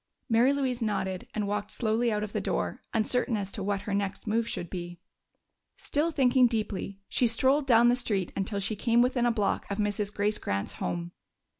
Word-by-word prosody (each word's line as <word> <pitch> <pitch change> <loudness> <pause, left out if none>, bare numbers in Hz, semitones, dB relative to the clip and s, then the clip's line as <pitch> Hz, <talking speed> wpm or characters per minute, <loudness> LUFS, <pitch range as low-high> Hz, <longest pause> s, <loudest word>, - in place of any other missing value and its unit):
Mary 240 +2 +4
Louise 260 -3 -1
nodded 190 -4 -2
and 210 -2 -1
walked 205 0 -2
slowly 230 +1 0
out 210 -1 -1
of 210 - -6
the - - -1
door, - - -2
uncertain 235 +1 +1
as 200 -1 -4
to 200 - -5
what 200 0 -1
her 205 - -4
next 200 -1 -2
move 225 +1 0
should 175 - -3
be. 175 -1 -7 0.8
Still 300 +3 0
thinking 260 -4 +4
deeply, 210 -3 -3
she 245 - +2
strolled 265 +5 +3
down 235 -1 +6
the 240 - +5
street 205 -7 -1
until 200 +1 -2
she 200 +2 -2
came 235 +3 +3
within 245 -1 +1
a - - +3
block 210 -3 -1
of 200 - -2
Mrs. 205 -1 -1
Grace 210 +1 0
Grant's 100 0 -2
home. 175 0 -3
215 Hz, 195 wpm, -28 LUFS, 200-240 Hz, 0.8 s, down